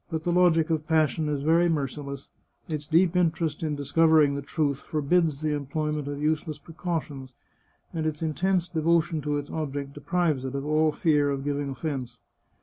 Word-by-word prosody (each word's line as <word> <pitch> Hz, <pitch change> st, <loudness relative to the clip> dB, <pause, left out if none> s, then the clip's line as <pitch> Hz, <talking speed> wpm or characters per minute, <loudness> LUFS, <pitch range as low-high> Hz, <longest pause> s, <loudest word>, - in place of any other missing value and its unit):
But 160 Hz, -2 st, -3 dB
the 175 Hz, -, 0 dB
logic 170 Hz, -2 st, +3 dB
of 155 Hz, -1 st, -1 dB
pas 155 Hz, -3 st, +3 dB
sion 155 Hz, +1 st, -2 dB
is 145 Hz, -2 st, -2 dB
very 165 Hz, +3 st, +4 dB
merciless; 140 Hz, -2 st, -4 dB, 0.4 s
its 150 Hz, -3 st, -4 dB
deep 170 Hz, +2 st, +3 dB
interest 160 Hz, -3 st, +1 dB
in 155 Hz, -2 st, -1 dB
discovering 150 Hz, +1 st, +4 dB
the 140 Hz, -, -3 dB
truth 140 Hz, -1 st, -1 dB
forbids 155 Hz, 0 st, 0 dB
the 155 Hz, -1 st, 0 dB
employment 150 Hz, +1 st, -2 dB
of 145 Hz, 0 st, -4 dB
useless 155 Hz, 0 st, -1 dB
precautions, 150 Hz, -5 st, -5 dB, 0.6 s
and 160 Hz, -1 st, -1 dB
its 155 Hz, +1 st, -3 dB
intense 175 Hz, +3 st, 0 dB
devotion 165 Hz, -1 st, +1 dB
to 145 Hz, 0 st, -1 dB
its 145 Hz, 0 st, -6 dB
object 140 Hz, -3 st, -4 dB
deprives 155 Hz, -2 st, 0 dB
it 130 Hz, +1 st, -4 dB
of 140 Hz, 0 st, -3 dB
all 155 Hz, +1 st, +3 dB
fear 150 Hz, -2 st, +2 dB
of 135 Hz, -1 st, -2 dB
giv 145 Hz, 0 st, -1 dB
ing 145 Hz, -1 st, -3 dB
offence. 135 Hz, -1 st, -4 dB
155 Hz, 180 wpm, -26 LUFS, 145-165 Hz, 0.6 s, very